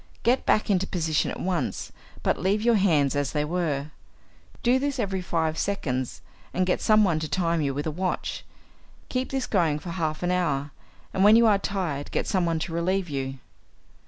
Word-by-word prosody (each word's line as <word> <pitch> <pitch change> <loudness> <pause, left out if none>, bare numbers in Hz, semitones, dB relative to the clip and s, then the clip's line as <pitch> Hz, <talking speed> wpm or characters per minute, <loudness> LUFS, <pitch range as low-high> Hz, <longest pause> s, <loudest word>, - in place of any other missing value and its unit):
Get 245 +3 +2
back 215 - +3
into 190 0 +1
position 160 -4 0
at - - -5
once, 175 -8 -2 0.3
but - - +1
leave 200 +4 +1
your 235 0 +4
hands 160 -10 +3
as 145 -1 -1
they 150 0 0
were. 150 -3 -2 0.7
Do 245 +2 +4
this 280 0 -1
every 195 -5 -1
five 160 -3 -1
seconds, 130 -11 -2 0.3
and 185 - +2
get 180 - 0
someone 210 -7 +4
to 155 -1 -4
time 170 -3 +1
you 140 -2 0
with 145 - -2
a 155 - -1
watch. 185 +4 -3 0.7
Keep 255 0 -1
this 265 -2 -1
going 165 -7 +1
for 170 +3 -7
half 160 -2 -2
an 175 - +1
hour, 145 -6 0 0.4
and 190 - +2
when 210 +2 +8
you 230 0 +6
are 205 -3 +4
tired 175 -9 -3
get - - -1
someone 175 -4 +1
to 165 - -4
relieve 180 +2 0
you. 135 -1 -3
175 Hz, 190 wpm, -26 LUFS, 155-200 Hz, 0.7 s, when